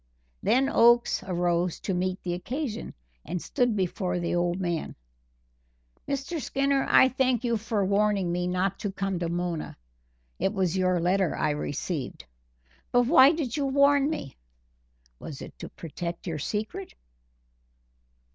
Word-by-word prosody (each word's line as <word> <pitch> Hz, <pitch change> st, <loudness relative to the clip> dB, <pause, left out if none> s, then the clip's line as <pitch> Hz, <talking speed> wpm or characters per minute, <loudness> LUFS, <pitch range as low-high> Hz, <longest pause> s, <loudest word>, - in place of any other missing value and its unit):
Then 265 Hz, +2 st, +3 dB
Oakes 240 Hz, -2 st, +4 dB
arose 175 Hz, -1 st, 0 dB
to 190 Hz, -, -2 dB
meet 185 Hz, +1 st, -2 dB
the 175 Hz, -, -2 dB
occasion, 240 Hz, -, -4 dB, 0.3 s
and 180 Hz, -, -3 dB
stood 245 Hz, +5 st, 0 dB
before 185 Hz, -1 st, -1 dB
the 170 Hz, -1 st, -2 dB
old 175 Hz, +1 st, 0 dB
man: 175 Hz, -3 st, -2 dB, 1.1 s
"Mr. 280 Hz, +4 st, -3 dB
Skinner, 275 Hz, 0 st, +1 dB
I 260 Hz, -, +7 dB
thank 255 Hz, -2 st, +1 dB
you 235 Hz, -1 st, +1 dB
for 215 Hz, -2 st, -1 dB
warning 200 Hz, -2 st, +1 dB
me 180 Hz, +1 st, -1 dB
not 185 Hz, +2 st, -1 dB
to 205 Hz, -, -3 dB
come 195 Hz, -2 st, -2 dB
to 170 Hz, -1 st, -2 dB
Mona 175 Hz, -2 st, -3 dB, 0.6 s
it 195 Hz, -, 0 dB
was 190 Hz, -3 st, 0 dB
your 185 Hz, -1 st, +2 dB
letter 180 Hz, 0 st, +1 dB
I -, -, +1 dB
received. 145 Hz, -, -4 dB, 0.7 s
But 245 Hz, 0 st, +4 dB
why 270 Hz, 0 st, +7 dB
did 300 Hz, -7 st, -2 dB
you 285 Hz, -2 st, 0 dB
warn 280 Hz, +1 st, +4 dB
me? 300 Hz, -, -5 dB, 0.8 s
Was 145 Hz, -4 st, -8 dB
it -, -, -10 dB
to -, -, -7 dB
protect 170 Hz, +1 st, -6 dB
your 165 Hz, -4 st, -3 dB
secret?" 210 Hz, +3 st, -4 dB
195 Hz, 145 wpm, -27 LUFS, 175-245 Hz, 1.1 s, I